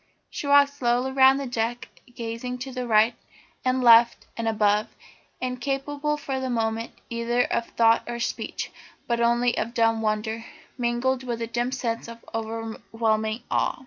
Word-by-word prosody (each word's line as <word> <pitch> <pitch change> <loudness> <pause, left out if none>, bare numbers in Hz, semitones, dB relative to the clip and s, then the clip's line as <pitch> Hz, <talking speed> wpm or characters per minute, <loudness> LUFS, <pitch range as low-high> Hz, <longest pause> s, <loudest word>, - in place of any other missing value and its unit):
She 285 - -5
walked 285 0 +6
slowly 250 -1 0
round 265 0 +6
the 280 - -3
deck, 240 0 -2 0.3
gazing 230 +2 -4
to 255 -2 -5
right 220 +1 +4 0.5
and 255 0 +1
left 235 0 +6
and 230 -1 -3
above, 210 -1 +2 0.5
incapable 275 +4 -2
for 270 -2 -3
the 260 0 -3
moment 225 -1 -1 0.2
either 235 +1 +1
of 235 - -1
thought 230 0 +4
or 240 0 -4
speech, 235 - -3 0.4
but 235 -1 0
only 240 +1 +3
of 235 +1 -3
dumb 225 -1 +3
wonder, 220 +1 -1 0.3
mingled 245 +1 0
with 240 -3 -4
a 230 - -2
dim 240 +2 -2
sense 235 -4 -3
of 230 0 -11
overwhelming 225 0 -2
awe. - - +1
235 Hz, 150 wpm, -25 LUFS, 225-255 Hz, 0.5 s, walked